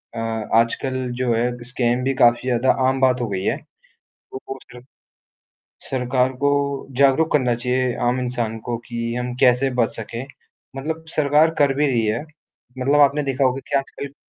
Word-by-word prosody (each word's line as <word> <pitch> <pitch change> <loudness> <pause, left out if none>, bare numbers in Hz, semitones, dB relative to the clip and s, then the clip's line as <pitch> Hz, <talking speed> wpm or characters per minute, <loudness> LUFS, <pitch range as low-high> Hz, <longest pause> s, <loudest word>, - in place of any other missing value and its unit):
अ, - - -4
आजकल 115 +3 0 0.2
जो 125 -2 +1
है 120 +2 +1
स्कैम 125 0 0
भी 135 - +1
काफ़ी 120 0 +5
ज़्यादा 125 +2 +3 0.2
आम 130 0 +1
बात 125 -1 +3
हो 120 - -1
गई 95 -2 -2
है। - - +1 0.8
वो 130 - -6
वो 135 - -5
फिर 125 - -11 1.1
सरकार 130 0 +1
को 140 - +4 0.5
जागरूक 140 +4 +4
करना 125 -5 +2
चाहिए 125 +1 0
आम 125 +1 +1
इंसान 120 -3 -2
को 120 - -1
कि 115 0 -3
हम 125 0 -3
कैसे 125 +2 +4
बच 115 - -1
सकें, 115 +3 -6 0.5
मतलब 160 +4 -4
सरकार 150 +2 +4
कर 140 -2 +4
भी 150 +1 +2
रही 115 -4 +1
है, 110 +4 0 0.6
मतलब 140 +3 +2
आपने 145 +1 +4
देखा 135 0 0
होगा 130 +1 +1
कि 140 - +3
आजकल 140 0 -6
125 Hz, 170 wpm, -21 LUFS, 120-135 Hz, 1.1 s, काफ़ी